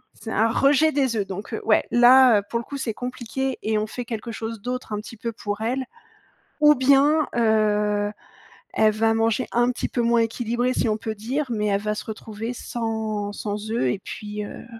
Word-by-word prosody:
c'est 225 - -8
un 225 +2 +2
rejet 290 +5 +4
des 270 -5 +1
œufs. 205 -3 -1
Donc 195 +2 -7
heu, - - -3
ouais 220 - +3
là 245 -2 +7
pour 235 +4 -3
le 235 - -7
coup 280 - -6
c'est 250 -5 -3
compliqué 250 +1 -4
et 220 0 0
on 210 - 0
fait 245 +3 -6
quelque 230 0 -5
chose 225 -1 -6
d'autre 250 -1 -4
un - - -1
petit 225 +2 -10
peu 230 +2 -4
pour 205 -2 -5
elle. 255 +4 -1 0.8
Ou 300 0 +8
bien, 280 +3 +4
heu, 210 -2 +2 0.6
elle 215 0 +4
va 225 +1 +2
manger 225 +2 +1
un 240 +1 +3
petit - - -3
peu 240 - -1
moins 235 0 +3
équilibré 240 +2 0
si 235 - 0
on 215 - 0
peut 220 0 -5
dire, 255 +8 -2
mais 210 -2 -1
elle 200 -1 +1
va 210 0 -1
se - - -5
retrouver 220 +1 -6
sans 220 -4 -3
sans 210 +1 -5
œufs 225 - +1
et - - -3
puis, 210 0 -6
heu, 205 - -9
225 Hz, 205 wpm, -23 LUFS, 215-245 Hz, 0.8 s, Ou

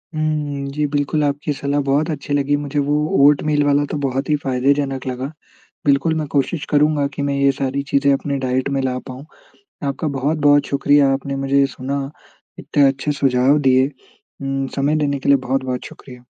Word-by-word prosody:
हम्म। 150 -2 -2
जी 150 0 0
बिल्कुल, 145 +1 0
आपकी 145 +1 -1
सलाह 140 +1 -1
बहुत 150 +4 +1
अच्छी 145 0 -4
लगी 145 0 +1
मुझे 145 0 -3
वो 145 - +1 0.3
ओटमील 150 0 +2
वाला 145 0 +2
तो 150 - -2
बहुत 135 +2 -2
ही 150 - +3
फ़ायदेजनक 135 +1 0
लगा। 130 0 -3 0.6
बिल्कुल 140 +3 +3
मैं 155 -1 -2
कोशिश 145 +3 0
करूँगा 150 -1 +2
कि 140 - -3
मैं 140 0 -1
ये 140 0 +3
सारी 135 +1 -1
चीज़ें 140 0 +3
अपने 140 0 -1
डाइट 130 0 -1
में 135 - +1
ला 125 -1 -1
पाऊँ। 130 +3 -8 0.6
आपका 140 +3 -2
बहुत-बहुत 145 0 +3
शुक्रिया 140 0 +3
आपने 135 0 -3
मुझे 135 0 +1
ये 140 - +5
सुना, 140 +2 -3 0.5
इतने 145 - +1
अच्छे 135 +2 -1
सुझाव 135 0 +2
दिए। 130 -1 +3 0.5
उम, 135 0 -2
समय 140 +2 +1
देने 140 -2 0
के - - -2
लिए 140 - +6
बहुत-बहुत 130 -1 -2
शुक्रिया। 125 -2 -13
140 Hz, 180 wpm, -19 LUFS, 135-145 Hz, 0.6 s, लिए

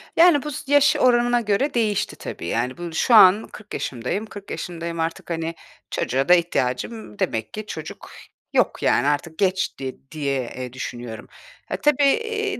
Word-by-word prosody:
Yani, 330 -4 +6
bu 300 - -4
s 280 0 -7
yaş 290 +2 +5
oranına 240 -2 +3
göre 220 +6 0
değişti, 215 -4 0
tabii. 85 - -7
Yani, 120 +6 -1
bu 175 -1 -6
şu 230 +8 +3
an 205 +1 +7
40 215 -1 -12
yaşındayım, 125 - -3
40 205 -2 -10
yaşındayım 170 -1 -5
artık. 165 +1 -3
Hani, 165 0 -3 0.4
çocuğa 135 +6 -1
da - - +9
ihtiyacım 170 - -1
demek 110 -1 -2
ki 215 0 -5
çocuk 155 -5 -8 0.4
yok, - - +1
yani, 120 - +3
artık 155 +3 -1
geçti 185 -9 -1
diye 145 -3 -1 0.2
eee, 125 -1 -6
düşünüyorum. 120 -3 -7 0.4
Ha, - - -1
tabii, 295 -1 +2
eee, 430 +5 0
180 Hz, 160 wpm, -23 LUFS, -, 0.4 s, da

